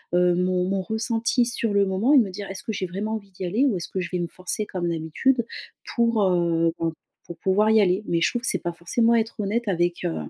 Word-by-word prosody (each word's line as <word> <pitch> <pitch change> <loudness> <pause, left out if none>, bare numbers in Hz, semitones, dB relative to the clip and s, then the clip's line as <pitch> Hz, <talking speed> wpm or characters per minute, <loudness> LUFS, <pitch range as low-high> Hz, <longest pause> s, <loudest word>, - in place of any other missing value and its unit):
heu, 180 0 +4
mon 180 +1 +1
mon 195 -1 0
ressenti 225 +3 0
sur 235 -3 -1
le 200 0 +4
moment 195 +9 +2
et 290 - +8
me 220 -6 +4
dire: 200 +1 -7
«Est-ce 195 0 -7
que - - -3
j'ai 190 - -2
vraiment 205 +5 -3
envie 200 -3 -8
d'y 185 0 -8
aller, 215 +10 +1
ou 255 -7 +2
est-ce 175 - -5
que 190 - -3
je 175 -2 -3
vais 180 - 0
me 175 - -1
forcer 185 +5 -4
comme 185 -4 -3
d'habitude 170 +10 0 0.5
pour, 230 -3 +2
heu, 170 -2 +2
ben 165 -1 -1 0.3
pour 170 - -8
pouvoir 205 +3 +2
y 220 -1 +6
aller?» 185 +1 +2
mais, 170 -1 0
je - - +4
trouve 240 - -2
que - - -1
c'est - - +1
pas 175 - -1
forcément 225 +8 +1
être 225 0 -1
honnête 220 +3 -1
avec, 175 -2 0
heu, 80 - -1
195 Hz, 255 wpm, -24 LUFS, 175-225 Hz, 0.5 s, et